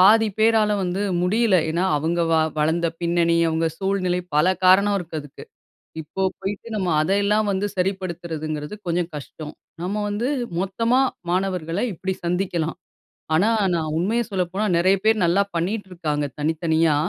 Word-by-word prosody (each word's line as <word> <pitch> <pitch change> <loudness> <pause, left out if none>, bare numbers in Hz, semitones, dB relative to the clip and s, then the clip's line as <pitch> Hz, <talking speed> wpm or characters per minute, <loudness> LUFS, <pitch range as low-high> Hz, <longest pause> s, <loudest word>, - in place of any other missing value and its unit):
பாதி 225 0 +2
பேரால 220 -1 +4
வந்து 185 +2 -1 0.2
முடியல. 210 +2 +3
ஏன்னா 170 +3 0
அவங்க 165 +4 0
வ - - +5 0.2
வளர்ந்த 160 +3 +1
பின்னணி 170 0 +2
அவங்க 160 +1 0
சூழ்நிலை 190 -2 0 0.2
பல 150 +3 +4 0.2
காரணம் 200 +2 +5
இருக்கு 165 -3 -5
அதுக்கு. 145 -2 -12 0.6
இப்போ 160 +5 -6 0.2
போய்ட்டு 195 +3 -5
நம்ம 190 -4 -1
அத 170 +5 0
எல்லாம் 210 +1 +2
வந்து 195 +1 -1
சரிப்படுத்துறதுங்கிறது 170 -4 -3
கொஞ்சம் 170 0 0
கஷ்டம். 150 +1 -8 0.3
நம்ம 205 +3 -2
வந்து 210 +4 -1 0.3
மொத்தமா 230 +7 +1 0.3
மாணவர்களை 180 0 -1
இப்படி 190 +3 -3
சந்திக்கலாம். 175 -2 -1 0.6
ஆனா, 185 +8 +4 0.3
நான் 155 -2 -1
உண்மையை 225 +6 0
சொல்லப்போனா 190 +2 -1
நெறைய 185 +3 +4
பேர் 220 -2 +3
நல்லா 180 +4 +3
பண்ணிட்டு 190 +4 -2
இருக்காங்க 150 -4 -2
தனித்தனியா. 160 0 +2
180 Hz, 140 wpm, -23 LUFS, 165-200 Hz, 0.6 s, வ